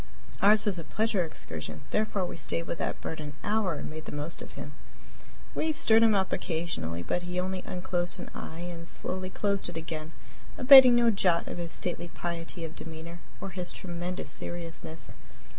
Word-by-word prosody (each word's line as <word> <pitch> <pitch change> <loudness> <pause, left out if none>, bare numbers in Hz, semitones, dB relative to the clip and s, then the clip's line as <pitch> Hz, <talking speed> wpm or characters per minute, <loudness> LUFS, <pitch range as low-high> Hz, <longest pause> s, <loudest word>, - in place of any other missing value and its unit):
Ours 210 +2 +6
was 195 -4 +1
a - - -5
pleasure 215 0 +1
excursion; 80 - -5
therefore 210 -3 +1
we - - -5
stayed 165 +1 -2
with 170 - -4
that - - -2
bird 160 - -4
an 150 -1 -6
hour 210 -2 +1
and - - -5
made 155 0 -7
the - - -6
most 145 +3 -4
of - - -9
him. - - -7 0.8
We 315 - +1
stirred 225 -7 +5
him 225 -2 +6
up 190 -1 +1
occasionally, 160 - -2
but 175 - -1
he 180 +1 -3
only 185 0 -2
unclosed 175 -1 -2
an - - -7
eye 160 +1 -7
and 170 -1 -6
slowly 185 +1 -3
closed 200 0 0
it 175 - -6
again, 160 -1 -5 0.4
abating 260 -1 +10
no 235 -1 +5
jot 180 -4 +2
of - - -5
his 170 -1 -4
stately 175 -1 -2
piety 170 0 -4
of 160 - -8
demeanor 165 +1 -8 0.2
or 195 - -5
his 180 0 -2
tremendous 175 0 -4
seriousness. 165 -1 -6
175 Hz, 185 wpm, -29 LUFS, 165-195 Hz, 0.8 s, abating